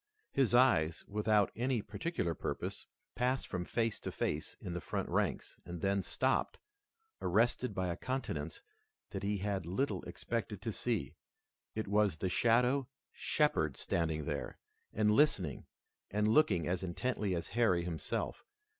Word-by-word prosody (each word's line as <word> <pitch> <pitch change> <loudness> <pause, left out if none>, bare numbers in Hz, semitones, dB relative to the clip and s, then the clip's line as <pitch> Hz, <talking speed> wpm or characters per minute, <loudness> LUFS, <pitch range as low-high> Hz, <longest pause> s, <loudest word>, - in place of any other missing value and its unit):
His 130 -3 +3
eyes, 85 -11 +4
without 105 0 +2
any 120 -1 0
particular 165 - -2
purpose, - - -4 0.3
passed 125 +1 +1
from 90 -2 -3
face 115 +1 0
to - - -4
face - - -2
in 90 - -5
the 90 - -3
front - - -2
ranks, - - -1
and 85 -1 -6
then 100 +2 +1
stopped, - - 0 0.6
arrested 115 +3 +2
by 95 -1 0
a 85 - -1
countenance 85 - -3 0.5
that - - -4
he 100 +1 0
had 95 -3 -2
little 130 +11 0
expected 115 -4 -3
to 115 - -1
see. 110 - -1 0.6
It 110 -1 -2
was 100 -4 +3
the 95 - -1
shadow, 125 +6 +3 0.2
Shepard, 80 - +1
standing 80 -3 -1
there, 70 -3 -3 0.3
and 105 0 +3
listening, 100 - +2 0.4
and 105 +1 +1
looking 110 - +4
as 90 +1 0
intently 95 +1 -1
as 85 - -4
Harry 105 -8 +3
himself. 90 +6 -3
105 Hz, 145 wpm, -34 LUFS, 85-120 Hz, 0.6 s, eyes